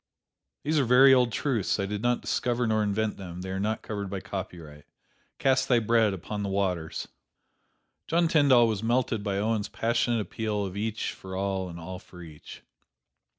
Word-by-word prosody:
These 155 +1 +1
are - - +3
very 130 +2 +7
old 125 -2 +4
truths 115 -7 0
I 100 - 0
did 105 +1 -4
not 120 +1 +1
discover 120 0 0
nor 110 -1 +1
invent 105 +1 -1
them 90 -2 -8
they 95 0 -5
are 95 - -3
not 110 +2 -2
covered 100 -2 -4
by 95 0 -4
copyright: 85 -7 -8 0.5
"Cast 130 -1 +2
thy 125 - +5
bread 115 -1 +3
upon 100 +3 -5
the 100 - -2
waters." 90 -5 -2 1.0
John 170 +1 +2
Tyndall 140 -7 +5
was 110 -3 -1
melted 115 -2 0
by 100 -2 -1
Owen's 110 0 -1
passionate 115 0 0
appeal 105 -1 -2
of 95 -1 -6
each 110 +1 -2
for 95 0 -9
all 95 -1 -2
and 85 0 -8
all 90 +2 -7
for 90 -1 -13
each. 75 -3 -12
105 Hz, 180 wpm, -27 LUFS, 95-120 Hz, 1.0 s, very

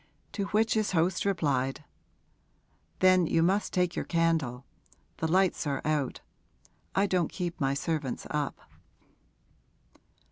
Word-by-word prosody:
To 200 - -2
which 220 +2 +2
his 215 -3 0
host 175 +2 +1
replied, 145 -8 0 1.2
'Then 185 -2 +5
you 165 - +2
must 195 +4 +1
take 180 -1 0
your - - -1
candle; 160 -7 0 0.5
the 160 - -1
lights 185 -1 +2
are 140 -1 -1
out; 150 -3 -1 0.7
I 195 - +3
don't 180 -4 0
keep 175 -3 -4
my 135 0 +1
servants 150 -3 -2
up.' 150 -2 -2
165 Hz, 120 wpm, -29 LUFS, 150-185 Hz, 1.2 s, Then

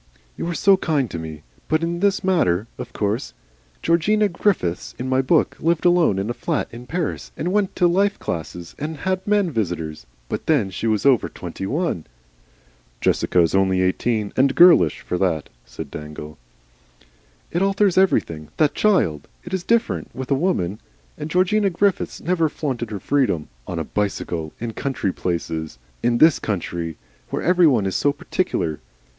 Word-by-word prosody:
"You - - -4
are 170 - -2
so 195 +1 +5
kind 145 - 0
to 85 - -4
me. 80 -2 -8 0.2
But 155 +1 +1
in 170 +1 -1
this 200 +1 +1
matter. 110 - +2
Of 125 -1 -6
course 105 - -2 0.5
Georgina 205 +6 +3
Griffiths 170 - -1
in 130 - -4
my 130 0 +2
book 155 +5 +2
lived 170 +1 +1
alone 175 - +4
in 95 +2 -1
a 120 - -1
flat - - -2
in 120 +1 -10
Paris 170 0 -3
and 175 +4 -2
went 205 -2 +1
to 180 - +3
life 195 +4 +2
classes 85 +1 -5
and 155 +1 -4
had 185 0 -1
men 205 -4 +2
visitors, 85 - -3 0.2
but - - -5
then 130 -12 +2
she 105 +5 -3
was 110 +1 +1
over 135 -4 +4
twenty 95 - -6
one." 145 - -1 0.9
"Jessica 90 - +2
is 85 - +2
only 95 -1 +3
seventeen, 100 +3 0
and 135 +1 +3
girlish 170 - +6
for 90 - -3
that," 85 -6 0 0.2
said - - -8
Dangle. 75 -1 -8 1.1
"It 175 - 0
alters 195 -1 +2
everything. 80 - +2
That 150 -2 +3
child! 175 - +1 0.2
It 175 - -9
is 190 -2 -1
different 230 +3 0
with 130 +1 -6
a - - +6
woman. 135 - 0 0.4
And 150 0 -6
Georgina 195 +4 +2
Griffiths 195 +2 0
never 165 -3 +1
flaunted 130 -7 -3
her 105 -2 -5
freedom 125 - 0 0.2
on 90 - -4
a 80 - -1
bicycle, 85 -4 -3
in 115 -1 -4
country 130 -9 -2
places. 80 -5 -3 0.2
In 120 0 +2
this 155 -3 +6
country. 85 -6 -3 0.3
Where - - -3
every 180 -1 +5
one 120 -9 +3
is 95 -2 -2
so 145 - +2
particular. 80 - -2
130 Hz, 170 wpm, -22 LUFS, -, 1.1 s, girlish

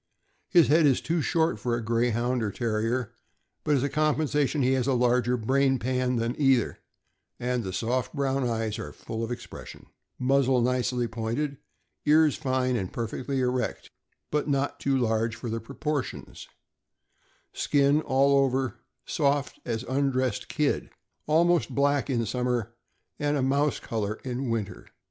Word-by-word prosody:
His 175 -4 +6
head 155 +1 +5
is 135 - +3
too 165 0 -1
short 165 +2 +1
for 120 -1 -1
a 120 -2 -4
Greyhound 120 +2 +1
or 110 - 0
Terrier, 115 +2 -1 0.5
but 150 - +2
as 135 - +1
a - - +2
compensation 150 -1 +1
he 130 +1 +3
has 130 -1 0
a 135 - +3
larger 125 0 +2
brain 135 +3 +2
pan 125 +1 0
than 115 +1 0
either, 135 -5 +3 0.6
and 125 -1 -1
the 95 - -4
soft 120 +6 -1
brown 135 -1 0
eyes 115 -3 -1
are - - -6
full 115 0 -5
of 115 - -3
expression; 120 0 -8 0.3
muzzle 130 0 +3
nicely 125 0 +1
pointed; 115 +6 -3 0.5
ears 155 0 +4
fine 130 -3 0
and 95 -6 -2
perfectly 130 +4 -3
erect, 125 0 -2 0.4
but 150 0 0
not 140 0 0
too 135 -1 +1
large 115 -2 0
for 115 0 -5
the 115 - -2
proportions; 140 +3 -4 1.1
skin, 145 +1 +2
all 140 0 +3
over, 130 -3 -1 0.3
soft 140 0 0
as 115 -1 -2
undressed 130 -3 0
kid, - - 0 0.4
almost 170 +2 +3
black 140 0 +2
in 120 -3 0
summer, 125 -1 -1 0.5
and 145 0 +1
a 135 - 0
mouse 140 +2 +1
col 110 -2 -3
or 105 - -3
in 130 0 -3
winter. 105 -5 -3
130 Hz, 155 wpm, -27 LUFS, 120-140 Hz, 1.1 s, His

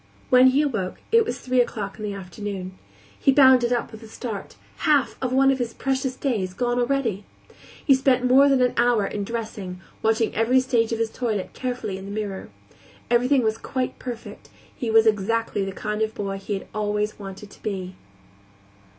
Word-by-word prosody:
When 255 0 +7
he 270 +3 +4
awoke, 220 -11 -2
it 460 0 +5
was - - -4
three 255 -1 +2
o'clock 210 -3 -4
in - - -6
the 205 -1 -3
afternoon. 190 0 -6 0.4
He 275 - +4
bounded 260 -3 +6
up 240 -1 -1
with 220 0 -11
a 225 - -11
start; 220 -2 -6 0.2
half 290 -4 +2
of 255 -1 -1
one 270 +1 +4
of 265 - -1
his 240 -2 -3
precious 265 -1 -1
days 200 -9 -2
gone 245 +2 0
already! 240 -6 0 0.6
He 275 - +6
spent 260 -1 +2
more 270 +3 +6
than 265 -2 +4
an 250 - +2
hour 235 -3 +3
in 205 +1 -3
dressing, 205 -4 -5 0.2
watching 225 0 +1
every 230 +4 +3
stage 240 -3 +1
of 230 - 0
his 225 -1 -1
toilet 220 -7 -3
carefully 245 -7 -4
in 190 - -9
the 200 - -7
mirror. 200 -3 -5 0.6
Everything 250 +2 +3
was 220 0 0
quite 255 -2 -3
perfect; 245 -3 -8 0.3
he 240 - -3
was 225 0 +5
exactly 220 0 +1
the 195 - -3
kind 210 +2 -4
of 220 0 -1
boy 195 -1 -3
he 200 +1 -3
had 195 - -7
always 210 0 -1
wanted 195 +1 -9
to - - -17
be. 190 -3 -4
225 Hz, 190 wpm, -24 LUFS, 205-255 Hz, 0.6 s, When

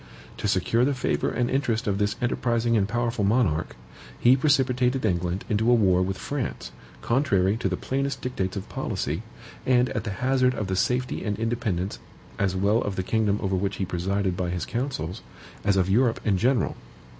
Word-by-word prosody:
To - - -2
secure 115 +1 +2
the 140 +1 +2
favor 130 - 0
and 120 - 0
interest 125 -4 0
of 100 -2 0
this 105 0 +1
enterprising 120 -1 +1
and 100 -2 +2
powerful 120 -2 -1
monarch, 100 -7 +1 0.4
he 125 +2 +6
precipitated 130 -3 +2
England 90 -1 -1
into 110 +2 +1
a 120 - +6
war 95 -5 +3
with 95 +1 -1
France, 135 +7 -4 0.3
contrary 105 -7 +2
to 105 -4 -1
the 95 - -2
plainest 140 +1 -2
dictates 100 -7 -3
of 95 - -5
policy, - - -3 0.4
and 125 -1 +3
at - - -3
the 115 - -4
hazard 130 -1 +3
of 105 - -2
the 95 0 -2
safety 125 +6 0
and 105 -2 -2
independence, 110 -5 -2 0.4
as 95 -1 +1
well 100 +5 +2
of 100 - -3
the 95 - -1
kingdom 105 0 +1
over 95 -1 0
which 95 +1 -1
he 95 - -2
presided 95 +2 -1
by 90 -1 -2
his 90 0 -2
counsels, 115 - -3 0.4
as 100 -1 +2
of 95 -1 +2
Europe 115 +4 +2
in 105 -3 +3
general. 120 +6 +1
110 Hz, 185 wpm, -25 LUFS, 95-125 Hz, 0.4 s, he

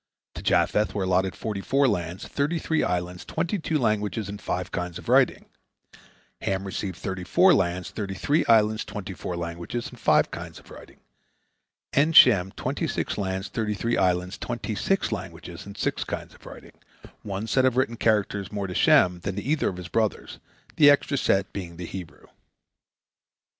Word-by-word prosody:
To - - -7
Japheth 105 0 +2
were 100 - 0
allotted 95 0 +1
forty 105 -3 -4
four 135 +6 +2
lands, 90 -5 -2
thirty 145 +4 -1
three 160 0 0
islands, 90 0 -2
twenty 170 +5 -2
two 160 -1 0
languages, 105 - -1
and 100 0 -7
five 90 0 -3
kinds 90 -1 -4
of - - -11
writing; - - +3 1.0
Ham 95 0 -1
received 95 -2 -4
thirty 95 0 -4
four 180 - +5
lands, 90 -1 0
thirty 100 -3 -4
three 145 - +1
islands, 110 -1 +4
twenty 105 -2 -6
four 90 -1 -5
languages, 85 +7 -5
and - - -13
five - - +3
kinds - - -7
of - - -16
writing; - - -13 1.0
and 155 +4 +3
Shem 95 - +7
twenty - - -2
six - - -2
lands, 95 -1 -3
thirty 105 -2 -2
three 115 +3 -1
islands, 90 0 0
twenty 120 -2 -4
six 195 - 0
languages, 90 -3 -7
and 100 - -10
six - - -1
kinds - - -6
of - - -16
writing—one 100 +1 -9
set 130 +4 +2
of 130 -1 +2
written 125 -2 +1
characters 105 -3 0
more 100 -1 -3
to 90 - -5
Shem 90 0 +4
than 95 +2 -4
to 100 - -4
either 150 +3 +1
of 90 - -7
his 90 -1 -7
brothers, 110 +4 -2 0.4
the 145 -2 +8
extra 145 0 +3
set 95 -7 +1
being 85 -4 -6
the 90 - -6
Hebrew. 85 -1 -9
100 Hz, 175 wpm, -25 LUFS, 90-115 Hz, 1.0 s, the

